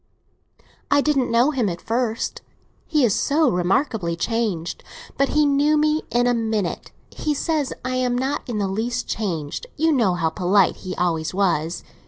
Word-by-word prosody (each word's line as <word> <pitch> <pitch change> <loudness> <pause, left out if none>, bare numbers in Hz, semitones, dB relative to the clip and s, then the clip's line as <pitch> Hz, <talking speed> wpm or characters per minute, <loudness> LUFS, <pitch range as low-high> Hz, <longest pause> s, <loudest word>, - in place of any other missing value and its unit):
"I 285 - +4
didn't 275 -4 +1
know 240 +5 +3
him 250 -8 0
at 170 -1 -5
first; 230 -1 -2 0.5
he 300 -5 +3
is 215 - +2
so 295 -2 +2
remarkably 180 - 0
changed. 205 -4 -2 0.3
But 275 0 +1
he 300 0 +3
knew 290 +2 +3
me 305 +1 +2
in 240 0 +2
a 245 - +3
minute. 220 -6 -2 0.2
He 300 -1 -2
says 305 -2 -1
I 255 0 -1
am 250 -1 +1
not 270 +3 -1
in 230 - -2
the 200 -2 0
least 220 +5 -2
changed. 175 - -3
You 320 +1 +3
know 225 - +2
how 165 -2 0
polite 185 +2 +2
he 185 -1 -6
always 170 -1 -1
was. 175 -4 0
235 Hz, 170 wpm, -22 LUFS, 185-280 Hz, 0.5 s, I